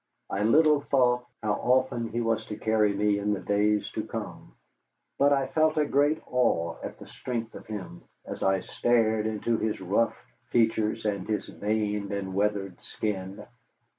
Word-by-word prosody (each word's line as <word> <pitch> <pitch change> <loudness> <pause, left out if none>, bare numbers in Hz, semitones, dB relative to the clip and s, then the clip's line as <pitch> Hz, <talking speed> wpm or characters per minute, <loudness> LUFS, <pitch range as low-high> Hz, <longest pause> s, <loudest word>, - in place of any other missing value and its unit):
I 100 - -1
little 150 +6 +5
thought 125 -3 +2 0.2
how 105 -1 +1
often 125 +1 +1
he 120 +2 -2
was 115 -1 0
to 105 - -6
carry 110 -2 +2
me 100 0 +1
in 105 -1 0
days 105 0 +1
to - - -2
come, - - -7 0.7
but 140 +1 +5
I 135 -1 +3
felt 155 +3 +1
a 150 - +3
great 145 +2 +2
awe 115 -10 +1
at - - -6
the - - -11
strength 115 -2 -5
of - - -11
him, 105 -5 -7 0.2
as - - -7
I 95 -1 +2
stared 110 -2 +1
into 110 +1 -1
his 110 -1 -1
rough 100 +5 +1 0.3
features 110 -1 +1
and 100 -3 -1
his 105 - -1
veined 105 -1 -2
and 100 -2 -3
weathered 100 -2 -1
skin. 95 -2 -4
110 Hz, 165 wpm, -27 LUFS, 100-120 Hz, 0.7 s, little